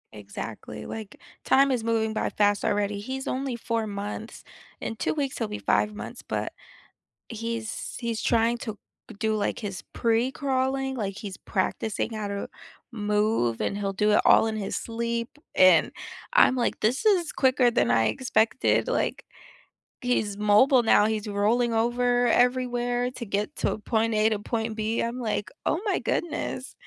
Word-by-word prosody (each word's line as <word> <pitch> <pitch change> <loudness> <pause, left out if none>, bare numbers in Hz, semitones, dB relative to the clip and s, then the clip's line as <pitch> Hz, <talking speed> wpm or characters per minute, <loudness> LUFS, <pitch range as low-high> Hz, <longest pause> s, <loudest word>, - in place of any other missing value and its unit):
Exactly, 105 +1 -8
like 215 -2 -8 0.2
time 275 +1 +4
is 240 -3 -1
moving 220 -1 +1
by 215 - -1
fast 205 -1 +1
already, 205 0 0
he's 260 +5 -5
only 260 -1 -2
4 230 -1 -2
months. 205 +2 -6 0.4
In 225 - -4
2 - - 0
weeks, 280 -4 -2
he'll 225 - -1
be 210 0 -5
5 210 0 +1
months, - - -7
but - - -3 0.8
he's 230 -1 -4
he's 235 -2 -2
trying 230 0 +2
to 220 -4 -5 0.4
do 220 0 +1
like 205 -1 -1
his 200 -4 -5
pre-crawling, 265 +3 0
like 200 -5 -3
he's 200 -3 -6
practicing 205 +5 -2
how 215 -2 -3
to 200 0 -4 0.5
move, 210 - +1
and 200 - -1
he'll 200 -1 -1
do 210 +2 +1
it 210 - +5
all - - +6
in 220 - -2
his 205 -2 -3
sleep, 235 0 -3 0.3
and 185 -3 +6 0.4
I'm - - +5
like, 245 -2 0
this 245 - 0
is 370 -6 +3
quicker 255 -2 +3
than 120 - +2
I 115 0 +3
expected, 225 - +1
like - - -1 0.8
he's 220 -5 0
mobile 210 +6 +5
now. 225 -2 +5
He's 215 -1 -1
rolling 220 +4 +1
over 245 +2 +2
everywhere 245 0 +1
to 245 -2 -7
get 205 0 -2
to - - 0
point 220 +1 0
A 215 +1 +4
to 215 -2 -1
point 225 +1 -3
B. 220 +1 -1
I'm 235 +2 -3
like, 210 -4 -2
oh 325 - +1
my 410 - +1
goodness. 290 -5 -3
225 Hz, 160 wpm, -26 LUFS, 210-245 Hz, 0.8 s, all